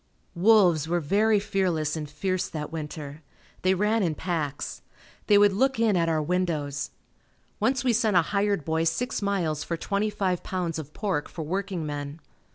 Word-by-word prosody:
Wolves 180 -5 +4
were 175 +1 +1
very 205 +7 +3
fearless 180 -7 0
and 150 -2 -5
fierce 185 +5 -2
that 150 -2 -5
winter. 150 -1 -6 0.4
They 185 +1 +3
ran 210 +4 +2
in 165 -5 0
packs. 155 -5 -3 0.5
They 205 - +6
would 205 -1 +5
look 265 +4 +1
in 225 -3 +3
at 165 -2 +2
our 155 -1 +1
windows. 150 -5 -1 0.7
Once 245 +4 +1
we 250 -2 +3
sent 220 -4 +3
a 170 - +5
hired 200 -2 0
boy 160 0 0
six 190 +11 -1
miles 175 -7 0
for 170 - -3
twenty 200 +5 -1
five 185 -4 -1
pounds 175 -4 -3
of 150 -1 -8
pork 190 -8 -2
for 165 - -6
working 185 0 -3
men. 145 +1 -5
180 Hz, 170 wpm, -26 LUFS, 155-205 Hz, 0.7 s, They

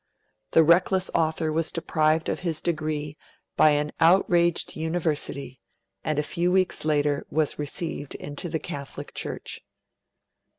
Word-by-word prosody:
The 165 - +7
reckless 180 +3 +3
author 160 -1 +1
was 160 +1 0
deprived 155 -1 +1
of - - -1
his 165 -4 -2
degree 155 -3 -2 0.4
by 155 - +6
an 150 0 -1
outraged 170 0 +3
University, 155 -5 -2 0.4
and 155 -2 -1
a 150 - +2
few 175 +3 0
weeks 185 0 +1
later 145 -2 +1
was 155 -1 0
received 150 -1 -4
into 145 +5 -6
the 160 - -1
Catholic 140 -2 -7
Church. - - -5
155 Hz, 130 wpm, -26 LUFS, 150-170 Hz, 0.4 s, The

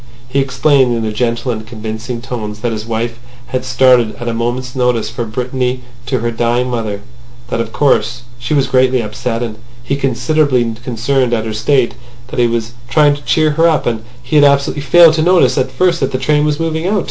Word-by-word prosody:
He 135 +2 0
explained, 135 -1 +2
in 110 - -3
gentle 120 +2 -1
and 110 -2 -4
convincing 110 +2 -6
tones, 110 -5 -5
that 120 - -1
his 110 0 -5
wife 115 +1 -3 0.3
had 130 -1 -2
started 125 -2 +3
at 120 - -7
a 115 - -1
moment's 120 +2 -3
notice 125 -4 0
for 120 0 -4
Brittany 125 +2 -2 0.3
to 130 -4 -1
her 120 0 -1
dying 120 +2 0
mother; 110 -4 -3 0.5
that, 115 - -1
of 115 -1 -5
course, 120 -4 +1 0.2
she 150 +5 -2
was 140 -2 +3
greatly 130 -1 +2
up - - -7
set, 120 -1 -2
and 110 -2 -5 0.3
he 130 +3 -1
considerably 135 -3 +1
concerned 125 +1 0
at 110 -1 -2
her 110 - -3
state; 120 +3 +1 0.4
that - - -4
he 120 - +4
was 115 -1 -2 0.2
trying 150 -1 +4
to 145 - -11
cheer 150 +4 +2
her 165 +3 +3
up, 155 - 0
and 115 -2 -2 0.2
had 145 +4 +3
absolutely 140 0 +2
failed 160 +4 +6
to 160 - 0
notice 165 -7 +4
at 130 -2 0
first 170 +5 +1
that 135 - -1
the - - -1
train 150 +3 +1
was 150 0 0
moving 165 +1 -1
out. 205 +1 +1
125 Hz, 205 wpm, -15 LUFS, 115-140 Hz, 0.5 s, failed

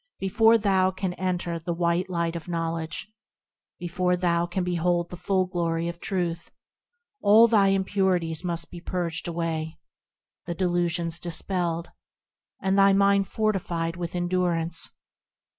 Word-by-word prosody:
Before 225 +4 +4
thou 190 -3 +2
canst 185 -1 -4
enter 175 -2 -1
the 170 +1 -3
white 170 +2 0
light 170 -1 -1
of 170 - -6
Knowledge, 165 0 -3 0.7
Before 180 +1 0
thou 175 -1 +1
canst 180 +1 -2
behold 175 0 0
the - - -5
full 185 +1 0
glory 170 -2 -1
of 170 0 -5
Truth, 175 -3 -2 0.7
All 215 +3 +7
thy 210 -4 +4
impurities 190 -4 +1
must 170 -2 -3
be 175 - -9
purged 170 -2 -2
away, 165 -2 -3 0.7
The 170 - -3
delusions 175 -1 0
dispelled, 170 -1 -2 0.7
And 195 +1 +1
thy 195 0 +6
mind 200 0 +3
fortified 175 -6 -1
with 175 0 -5
endurance. 175 -2 0
175 Hz, 130 wpm, -26 LUFS, 170-190 Hz, 0.7 s, All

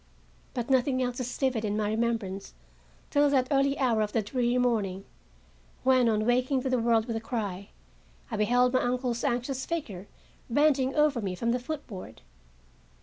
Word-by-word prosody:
But 240 -2 -2
nothing 260 0 +2
else 245 0 -3
is 250 -1 -4
vivid 260 -5 0
in 210 -1 -1
my 210 -1 0
remembrance 220 - -2 0.6
till 290 0 +4
that 260 -2 +2
early 275 0 +2
hour 240 -5 +2
of 210 -1 -2
the 225 - +1
dreary 245 +3 0
morning, 210 -6 0 0.8
when, 255 -2 +4
on 215 -1 +1
waking 255 +2 +1
to 265 - -1
the 255 - +2
world 230 -1 +2
with 230 -2 -3
a - - -5
cry, 205 -5 -4 0.6
I 220 - -2
beheld 245 +4 +3
my 255 - +3
uncle's 245 -1 -1
anxious 260 0 -1
figure, 210 - -4 0.4
bending 270 0 +2
over 300 -5 +3
me 190 -3 -3
from 235 +5 -1
the 250 - 0
foot 295 +4 -5
board. 185 - -10
245 Hz, 175 wpm, -28 LUFS, 220-260 Hz, 0.8 s, till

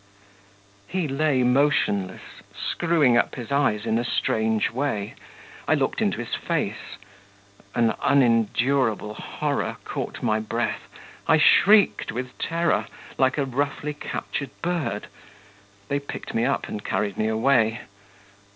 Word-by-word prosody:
He 180 -3 -1
lay 140 -2 +1
motionless, 125 -8 +1 0.2
screwing 155 -8 +2
up - - +1
his 120 0 -7
eyes 135 -7 +1
in 110 - +1
a - - -1
strange 110 -2 0
way. 115 -5 -2 0.5
I - - +4
looked - - -1
into - - +1
his - - -6
face - - -3 0.8
an 115 -2 +3
unendurable 115 -2 +2
horror - - -3
caught - - -5
my 110 0 +2
breath; 115 +2 -3 0.4
I 160 -1 +5
shrieked 200 +5 +5
with 125 +1 -5
terror, 170 0 0 0.3
like 130 +1 +3
a 140 - +1
roughly 145 +3 -2
captured 140 -1 -5
bird 165 - -2 0.8
they 140 - 0
picked 140 - -7
me 115 +1 +1
up 140 - 0
and 105 - -6
carried 100 -2 -1
me 110 - 0
away. 115 0 +2
125 Hz, 125 wpm, -24 LUFS, 110-145 Hz, 0.8 s, I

